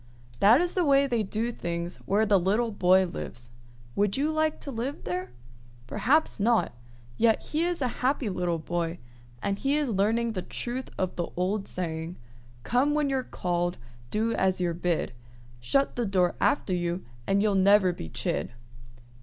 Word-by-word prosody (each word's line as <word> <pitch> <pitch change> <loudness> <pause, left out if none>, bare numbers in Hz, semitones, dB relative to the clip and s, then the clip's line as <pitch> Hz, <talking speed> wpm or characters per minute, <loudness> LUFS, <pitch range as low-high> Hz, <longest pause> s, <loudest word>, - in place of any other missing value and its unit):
That 225 +9 +6
is 350 0 -1
the 365 - +2
way 280 -2 +4
they 240 -4 0
do 215 +4 -2
things 170 -4 -4
where 210 +3 +3
the 200 -2 +4
little 215 +6 +1
boy 190 -1 +4
lives. 120 -8 -7 0.4
Would 205 +1 +1
you 295 +3 +1
like 310 0 0
to 280 - -6
live 255 +4 -4
there? 180 -4 -3 0.6
Perhaps 285 - +1
not; 225 - +2 0.4
yet 225 -1 +3
he 310 +2 +1
is 350 -5 -1
a - - +2
happy 260 -1 +1
little 180 -3 -1
boy, 170 +1 -2 0.5
and 200 0 -1
he 275 +2 +1
is 290 -5 0
learning 225 +4 +1
the 190 -4 -3
truth 245 +7 -5
of 185 -1 -1
the 175 - -1
old 195 +3 0
saying, 165 -1 -4 0.5
"Come 275 +5 +2
when 295 -2 +1
you're 265 -1 +1
called, 175 -6 -2 0.3
do 225 - 0
as 190 -1 +1
you're 175 -2 0
bid, 170 -5 -1 0.5
Shut 275 - +1
the 240 -2 -1
door 185 -2 +2
after 210 -9 +2
you, 175 0 -2 0.2
and 200 +1 +3
you'll 210 -1 +2
never 195 -1 +5
be 80 - -7
chid." 75 +4 -2
205 Hz, 170 wpm, -27 LUFS, 180-250 Hz, 0.6 s, That